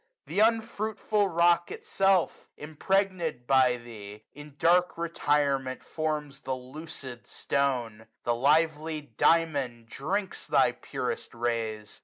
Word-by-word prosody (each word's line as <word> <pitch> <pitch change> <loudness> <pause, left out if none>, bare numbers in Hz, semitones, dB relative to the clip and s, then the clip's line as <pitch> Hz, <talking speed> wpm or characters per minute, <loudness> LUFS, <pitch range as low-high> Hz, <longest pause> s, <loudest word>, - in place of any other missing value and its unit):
Th* - - -2
unfruitful 220 -2 +1
rock 170 0 +3
itself, 195 -2 0
impregnM 165 -2 -1
by 130 -1 +4
thee, 110 -3 -11
140 145 - -10
In 145 -1 -13
dark 175 +2 +3
retirement 145 -5 0
forms 150 -3 -3
the 130 - -2
lucid 130 -2 -8
stone. 120 -6 -1 0.2
The 120 - 0
Kvely 150 +1 +1
Diamond 140 -9 +2
drinks 190 - -3
thy - - +4
purest 460 - -5
rays. 115 -3 -3
150 Hz, 110 wpm, -28 LUFS, 125-170 Hz, 0.2 s, by